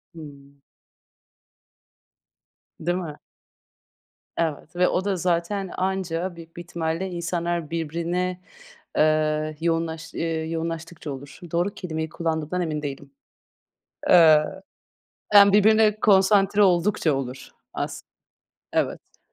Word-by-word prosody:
Hımm. 140 -3 -13 2.2
Değil 175 +2 -1
mi? 160 -5 -6 1.2
Evet 160 0 -2
ve 180 +1 +3
o 190 - 0
da 200 -2 +1
zaten 180 +3 -1
anca 185 -2 -2
büyük 165 0 -13
bir - - -5
ihtimalle 170 +2 -3
insanlar 170 -2 -2
birbirine, 170 +3 -2 0.6
ııı, 155 0 +2
yoğunlaş 165 -1 -2
ııı, 160 -1 -2
yoğunlaştıkça 165 -1 -5
olur. 135 +1 -10
Doğru 175 +4 0
kelimeyi 160 -5 -4
kullandığımdan 160 +1 -2
emin 155 -2 -3
değilim. 140 -1 -6 1.0
Iıı, 160 +1 +6 0.7
yani, 200 -1 +9
birbirine 215 +1 +4
konsantre 200 0 +4
oldukça 175 -4 +3
olur 130 -1 -5 0.3
as - - -4 0.7
Evet. - - -2
170 Hz, 100 wpm, -24 LUFS, 155-185 Hz, 2.2 s, yani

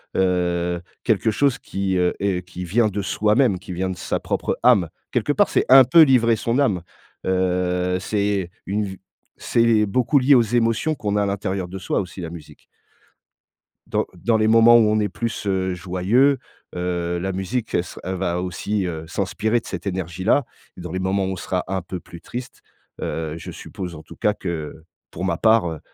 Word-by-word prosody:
Heu, 90 -2 0 0.2
quelque 110 -2 +2
chose 140 +3 +2
qui, 95 -1 -2
heu, 90 0 +2
est 95 -3 -1
qui 90 -1 -7
vient 110 +6 +2
de 100 0 -3
soi-même, 105 +1 +2
qui 90 -1 -8
vient 95 +2 -2
de 95 - -5
sa - - -2
propre - - -2
âme. 110 -9 +5 0.2
Quelque - - +1
part - - +3
c'est - - +1
un 135 0 +10
peu 135 +7 +6
livrer 120 -5 +4
son 115 +4 -1
âme, 100 -11 +2 0.4
heu, 90 -1 0
c'est 100 -2 -1 0.2
une 105 +2 0
v 95 -1 -8 0.4
c'est 115 -2 +3
beaucoup 125 +7 +2
lié 135 +2 +5
aux 120 - +6
émotions 115 +6 +1
qu'on 105 -7 -2
a 105 - +2
à - - 0
l'intérieur 100 -2 -2
de 95 +2 -7
soi - - -1
aussi 90 0 -6
la 85 - -5
musique 80 -3 -11 1.3
dans - - 0
dans 115 -2 +1
les 110 - +2
moments 115 +1 +7
où 110 -2 +4
on 110 0 +2
est 105 -2 0
plus, 115 +2 -4
heu, 95 -1 0
joyeux, 95 +10 +2 0.4
heu, 90 -1 -2
la 95 +2 -2
musique 105 +5 -3
elle 85 - +2
se - - -11
elle 95 +1 -3
va 90 -1 -1
aussi, 95 +3 -2
heu, 80 -2 -5
s'inspirer 110 +5 0
de - - -19
cette - - -6
énergie-là 95 - 0 0.3
et - - -8
dans 90 -1 -7
les 95 - -2
moments 95 +1 0
où 95 - -2
on - - -4
sera 90 0 -3
un 95 0 -2
peu 90 +1 -6
plus 85 -1 -13
triste, 125 0 -8 0.4
heu, 80 -1 -3
je 85 - -8
suppose 90 -3 -7
en 75 - -10
tout - - -13
cas 105 - +1
que, - - -8
heu, 80 -1 -6 0.3
pour 90 - -4
ma 85 -3 0
part, 110 -3 +4
heu, 80 - -6
95 Hz, 205 wpm, -22 LUFS, 90-110 Hz, 1.3 s, un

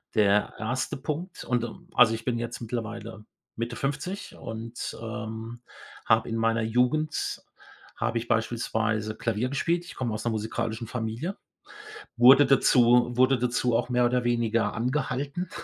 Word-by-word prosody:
Der 105 -1 +3
1. 125 +5 -2
Punkt 160 +6 -5
und, 120 -1 0
äh 120 - -3 0.2
also 120 -2 +6
ich 115 - -9
bin 120 -2 0
jetzt 120 0 -5
mittlerweile 115 -2 -5 0.3
Mitte 120 +1 -3
50 145 +10 -4
und, 115 +1 -6
ähm, 110 +1 -6 0.5
habe 115 0 +4
in 115 - -2
meiner 115 0 +1
Jugend 125 +7 0 0.6
habe 120 -1 -1
ich 115 +1 -4
beispielsweise 110 -1 0
Klavier 115 +2 -1
gespielt. 170 +5 0
Ich - - -10
komme 120 -4 -2
aus 110 - -4
'ner 120 - +1
musikalischen 110 +1 -3
Familie, 115 - -3 0.8
wurde 130 +4 +8
dazu 125 -2 +5
wurde 130 +1 +4
dazu 125 0 +1
auch 120 +2 -1
mehr 125 0 +3
oder 125 0 +1
weniger 115 -1 +1
angehalten, 140 +7 -2
120 Hz, 145 wpm, -27 LUFS, 115-125 Hz, 0.8 s, wurde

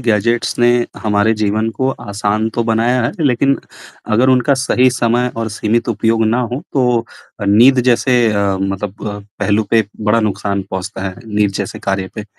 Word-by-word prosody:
Gadgets 115 0 0
ने 120 - +4 0.3
हमारे 105 +1 +2
जीवन 110 +2 0
को 130 +3 -1
आसान 105 0 -2
तो 120 - 0
बनाया 115 +2 +1
है, 120 - 0
लेकिन 140 +1 +2 0.6
अगर 125 +4 +3
उनका 130 +2 +3
सही 130 -1 +2
समय 120 0 0
और 115 -1 -2
सीमित 110 +3 -1
उपयोग 115 0 +1
ना 115 +3 +1
हो, 125 +3 -3
तो 125 -4 +1 0.4
नींद 125 +6 +6
जैसे 125 +1 +2 0.2
अ, 100 -2 0
मतलब 95 +1 -4
अ, 100 - -5 0.2
पहलू 105 +1 +2
पे 115 -1 +3 0.2
बड़ा 105 +2 +2
नुकसान 100 -1 -2
पहुँचता 95 +1 -5
है, 95 - -9
नीद 105 -1 0
जैसे 100 - -5
कार्य 95 -1 -2
पे। 105 - -6
110 Hz, 170 wpm, -16 LUFS, 105-120 Hz, 0.6 s, नींद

